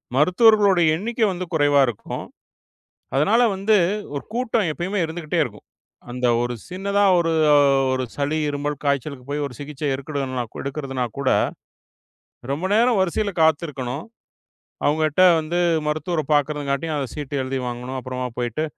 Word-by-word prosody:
மருத்துவர்களுடைய 190 - +5
எண்ணிக்க 230 +7 -4
வந்து 185 0 -4
குறைவா 145 -2 +4
இருக்கும். 115 -4 -5 0.9
அதனால 200 - +3
வந்து 200 +3 +2 0.4
ஒரு 140 - -4
கூட்டம் 230 -6 0
எப்பயுமே 180 +6 -3
இருந்துகிட்டே 160 -1 -2
இருக்கும். - - -10 0.4
அந்த 125 +1 -1 0.2
ஒரு 120 0 -2
சின்னதா 200 +2 0
ஒரு 165 -1 +1 0.6
ஒரு 130 0 -1
சளி, 145 +2 -1
இருமல், 145 +1 -3
காய்ச்சலுக்கு 140 -2 -2
போய் 145 0 -1
ஒரு 130 - -9
சிகிச்சை 145 0 -4
எடுக்குறனா 135 -2 -3 0.2
எடுக்குறதுனா 135 -3 -3
கூட, 135 -2 +1 1.2
ரொம்ப 155 +6 -3
நேரம் 230 0 +3
வரிசைல 195 +3 0
காத்திருக்கணும். 145 -4 0 0.8
அவுங்கட்ட 155 +3 +2 0.2
வந்து 165 +3 -2 0.3
மருத்துவர 155 +2 -1
பாக்குறதுங்காட்டியும், 145 +1 -1
அ, 135 -4 -4
சீட்டு 145 -2 -6
எழுதி 130 +1 -3
வாங்கணும். 125 +2 -5
அப்றமா 130 0 -4
போயிட்டு, 120 +5 -1
150 Hz, 130 wpm, -22 LUFS, 135-175 Hz, 1.2 s, மருத்துவர்களுடைய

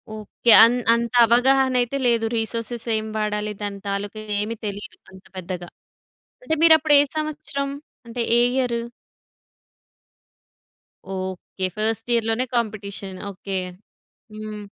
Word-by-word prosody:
Okay. 215 +2 0
అన్ 240 +2 +5 0.2
అంత 235 0 -1
అవగాహన 260 +3 +3
అయితే 245 +3 -2
లేదు. 230 -1 +2
రిసోర్సేస్ 230 +1 -3
ఏం 215 0 -4
వాడాలి? 210 0 -2
దాని 200 -1 -4
తాలూకా 200 +2 -4 0.2
ఏమి 220 +2 -2
తెలీదు 205 +1 -6 0.2
అంత 190 0 -15
పెద్దగా. 180 -1 -6 0.7
అంటే 320 - 0
మీరప్పుడు 315 -2 +6
ఏ - - +4
సంవత్సరం. 305 -2 -3 0.4
అంటే 235 +1 -4 0.2
ఏ - - +4
year? 245 -3 0 2.3
Okay. 190 0 -5
First 225 +2 -1
ఇయర్‌లోనే 230 +2 +1
competition 200 -4 -3
okay. 190 +1 -5 0.8
హ్మ్. 215 -1 -7
225 Hz, 115 wpm, -22 LUFS, 205-245 Hz, 2.3 s, మీరప్పుడు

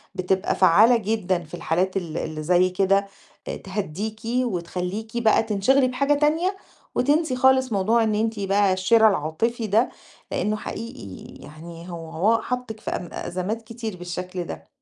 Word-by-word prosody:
بتبقى 185 0 0
فعّالة 215 +7 +6
جدًا 195 -5 -1
في 155 - -18
الحالات 180 +3 0
ال 170 -3 -4
اللي 155 -1 -4
زي 180 +3 +3
كده 195 +2 +2 0.4
آآ - - -3
تهدّيكِ 205 +2 -5
وتخلّيكِ 220 -2 -2
بقى 220 0 +4
تنشغلي 230 +5 +2
بحاجة 280 +3 +1
تانية 320 +6 +1 0.4
وتنسي 290 +1 +2
خالص 260 -1 +3
موضوع 220 +4 +2
إن 215 -1 +1
أنتِ 220 0 -1
بقى 195 0 +2
الشِرا 220 +4 +5
العاطفي 210 +8 -1
ده، 220 +4 +3 0.4
لإنّه 210 +1 0
حقيقي 210 - -8
يعني 165 +4 -11
هو 165 -2 -7
هو 220 +8 +2
حاطِّك 250 -2 -4
في - - -5
أم 175 - -4
أزمات 185 +6 -3
كتير 225 -3 -7
بالشكل 180 +1 -5
ده. 80 - -9
200 Hz, 150 wpm, -24 LUFS, 180-230 Hz, 0.4 s, فعّالة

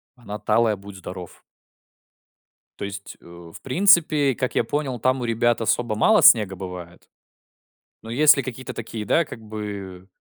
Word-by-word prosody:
Она 105 -4 -8
талая 110 +1 +1
будь 100 0 -12
здоров. 90 -1 -10 1.4
То - - -5
есть, 100 0 -8
э, - - -23 0.3
в - - -12
принципе, 155 -3 +3
как 130 +1 -3
я - - +2
понял, 140 -4 -3
там 130 +2 +1
у - - -3
ребят 120 0 0
особо 115 0 0
мало 215 - +4
снега 105 -4 +6
бывает. 90 -2 -10 1.0
Но 115 - -10
если 140 +4 +5
какие-то 130 0 -7
такие, 110 -1 -7
да, 170 - +2
как 120 - -10
бы, 100 -4 -8
115 Hz, 155 wpm, -22 LUFS, 100-130 Hz, 1.4 s, снега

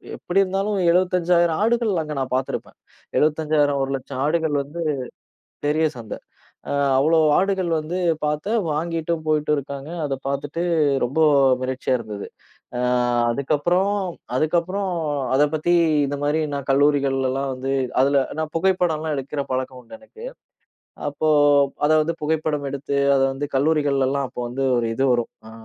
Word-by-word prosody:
எப்டி 185 +2 -1
இருந்தாலும் 195 +2 -1
75,000 175 -2 +2
ஆடுகள் 230 -5 +1
அங்க 155 -1 -5
நான் 130 -1 -3
பாத்துருப்பேன். 130 0 -4 0.4
75,000 150 -2 +2
100000 135 -1 -4
ஆடுகள் 160 -1 0
வந்து 145 +5 -9 0.9
பெரிய 155 +2 +2
சந்த. 115 -2 -7 0.6
அ - - -2 0.3
அவ்ளோ 160 +4 +3 0.2
ஆடுகள் 190 -2 0
வந்து 160 +4 -4 0.3
பாத்து, 150 +7 -2 0.2
வாங்கிட்டும் 165 +1 -2
போயிட்டு 150 -1 +1
இருக்காங்க. 140 +1 -6 0.2
அத 140 - -2
பாத்துட்டு 145 +4 -3 0.4
ரொம்ப 135 +6 -3 0.4
மிரட்சியா 130 0 -1
இருந்தது. 105 -3 -7 0.5
அ - - -2 0.5
அதுக்கப்புறம் 155 +9 +1 0.5
அதுக்கப்புறம் 175 +6 0 0.5
அதப் 145 +2 +3
பத்தி 175 +3 +1 0.3
இந்த 145 +1 -3
மாரி 150 +2 +1
நா - - -1
கல்லூரிகள்லாம் 135 -1 +1
வந்து 130 +1 -4 0.3
அதுல 140 0 +3 0.2
நான் 155 -1 -3
புகைப்படம்லாம் 165 -3 +1
எடுக்கற 140 +1 -3
பழக்கம் 130 0 -3
உண்டு 280 - -12
எனக்கு. 445 - -12 0.8
அப்போ 155 +2 -1 0.6
அதாவது 155 +1 +3
புகைப்படம் 150 -2 -1
எடுத்து 140 0 -3 0.2
அத 135 - +2
வந்து 145 +2 -4
கல்லூரிகள்லலாம் 140 -2 +1
அப்போ - - -6
வந்து 135 +2 -2
ஒரு 115 -1 0
இது 135 +2 +1
வரும் 120 -1 -1 0.2
அ - - -12
150 Hz, 130 wpm, -22 LUFS, 135-170 Hz, 0.9 s, அவ்ளோ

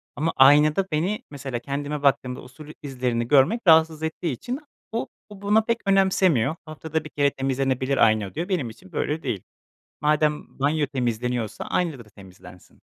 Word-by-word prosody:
Ama 160 +3 -1
aynada 150 +7 +5
beni 175 +8 -1
mesela 135 -4 -5
kendime 145 +3 -4
baktığımda 130 -2 +1
o - - -12
sul 140 +4 -13
izlerini 125 -4 -2
görmek 145 - +4
rahatsız 160 -1 +5
ettiği 160 0 -2
için 245 - -5 0.3
o 230 +2 -2 0.2
o 205 -2 -12
buna 210 +2 +3
pek 230 +1 0
önemsemiyor. 185 - +3
Haftada 160 0 -4
1 155 - -9
kere 140 -1 +1
temizlenebilir 135 0 -1
ayna 110 -3 +3
diyor 170 +6 -4
benim 160 -11 -1
için 185 +12 -15
böyle 155 0 -2
değil. 100 - -3 0.6
Madem 150 -1 0
banyo 145 +1 +1
temizleniyorsa 125 -3 -2
ayna 165 -7 -1
da - - -10
temizlensin. 90 -2 -16
145 Hz, 160 wpm, -24 LUFS, 125-160 Hz, 0.6 s, aynada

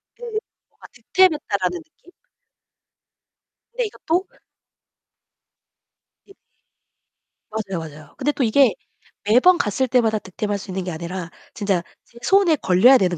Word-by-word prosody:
그 485 - -15
뭔가 445 -1 -9
'득템했다.'라는 310 - +1
느낌? 335 +2 -23 1.6
근데 485 0 -1
이것도 370 -3 -2 2.0
네. 390 - -18 1.2
맞아요, 200 -5 -3
맞아요. 155 -2 -11
근데 295 +3 0
또 275 - -2
이게 240 +1 +4 0.5
매번 255 - +5
갔을 260 - 0
때마다 225 -3 +2
득템할 205 +2 -4
수 190 -1 -9
있는 190 0 -3
게 180 - -4
아니라 170 +1 -6 0.2
진짜 195 -5 -1 0.2
제 235 - -21
손에 385 -5 +4
걸려야 235 +9 +5
되는 180 -4 0
220 Hz, 250 characters per minute, -21 LUFS, -, 2.0 s, 매번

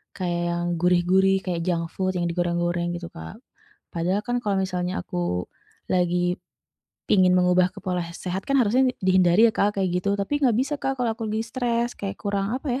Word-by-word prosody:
kayak 175 -2 -2
yang 175 0 -1
gurih-gurih, 180 +2 +3
kayak 175 -3 -2
junk 170 -2 +1
food 185 -1 -1
yang 175 - -1
digoreng-goreng 175 0 -1
gitu, 170 0 -6
Kak. 80 0 -8 0.6
Padahal 180 +4 0
kan 245 0 0
kalau 205 -2 0
misalnya 180 -1 -2
aku - - -6 0.7
lagi 180 0 +1 0.7
pingin 185 -2 +5
mengubah 180 0 +4
ke - - -9
pola 180 -1 -1
he 170 - -9
sehat 185 +2 -4
kan 275 - +3
harusnya 245 +4 +3 0.2
dihindari 185 +1 +4
ya - - -1
Kak, 205 - +3
kayak 190 - +1
gitu. 180 +2 -1
Tapi, 200 - -4
nggak 250 - +4
bisa 275 +3 -1
Kak, 270 - 0
kalau 235 -2 +1
aku 225 - -5
lagi 220 +1 -1
stres 240 -1 -1
kayak 195 -1 -4
kurang, 200 0 -1
apa 275 +1 -6
ya, - - -4
185 Hz, 190 wpm, -24 LUFS, 175-205 Hz, 0.7 s, pingin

